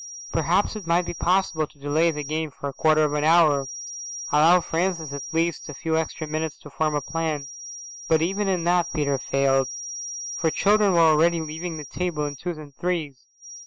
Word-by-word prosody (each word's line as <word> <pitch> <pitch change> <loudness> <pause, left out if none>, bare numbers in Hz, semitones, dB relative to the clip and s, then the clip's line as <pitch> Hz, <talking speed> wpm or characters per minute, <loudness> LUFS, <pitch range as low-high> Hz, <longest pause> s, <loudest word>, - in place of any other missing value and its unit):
Perhaps - - +1
it 205 -6 -7
might 170 +2 +3
be - - -4
possible 170 -2 +1
to - - -24
delay 145 +4 +2
the 150 -2 -3
game 155 +2 -2
for 140 +1 -7
a 140 - -5
quarter 155 +2 +3
of 150 -1 +1
an 150 0 0
hour, 155 -4 +4 0.6
allow 160 +4 +6
Francis 165 -3 -2
at 140 - -4
least 165 0 -1
a 150 - -7
few 160 +2 -1
extra 160 0 -2
minutes 155 0 -3
to 145 - -13
form 155 +1 0
a 145 - 0
plan, 155 -4 -3 0.6
but 160 - +4
even 195 +5 0
in 185 -3 0
that 175 0 +2
Peter 140 -3 0
failed, 135 0 +1 0.6
for 160 - 0
children 205 +3 +3
were - - +3
already 165 +1 +4
leaving 160 +2 -5
the 150 - -7
table 160 0 -2
in 145 -1 -4
twos 175 +4 -5
and 150 -2 -11
threes. 155 -5 -3
160 Hz, 195 wpm, -24 LUFS, 150-170 Hz, 0.6 s, allow